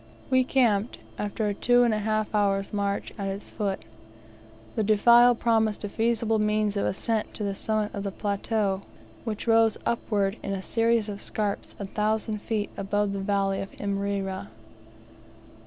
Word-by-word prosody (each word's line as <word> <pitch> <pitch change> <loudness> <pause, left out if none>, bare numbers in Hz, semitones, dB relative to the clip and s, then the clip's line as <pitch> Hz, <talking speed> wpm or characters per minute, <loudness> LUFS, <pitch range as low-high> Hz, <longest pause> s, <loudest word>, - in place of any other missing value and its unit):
We 260 0 +5
camped, 235 -5 +2 0.2
after 210 +1 -1
a 205 - 0
two 245 +4 +4
and 235 -2 +3
a 215 - 0
half 215 0 -1
hours' 200 -1 +1
march, 200 -1 -1
at 200 - -2
its 195 +1 -5
foot. 200 -3 -3 0.9
The 220 - 0
defile 235 +4 +6
promised 225 -2 +1
a 205 - -3
feasible 225 0 +1
means 210 -1 +1
of 200 - +1
ascent 220 +2 -2
to 210 - -4
the 200 -1 -1
summit 215 +1 -1
of 200 - -4
the 200 0 -3
plateau, 200 0 -1 0.4
which 215 -3 -4
rose 225 -1 +4
upward 205 -3 0
in 195 - -3
a 190 -1 -4
series 230 0 +1
of 205 -1 -6
scarps 205 -2 -2
a 200 - -5
thousand 215 +1 -1
feet 215 -2 -2
above 205 +1 0
the 200 - -3
valley 195 0 0
of 195 - -5
Imrera. 200 - -2
210 Hz, 165 wpm, -27 LUFS, 200-225 Hz, 0.9 s, defile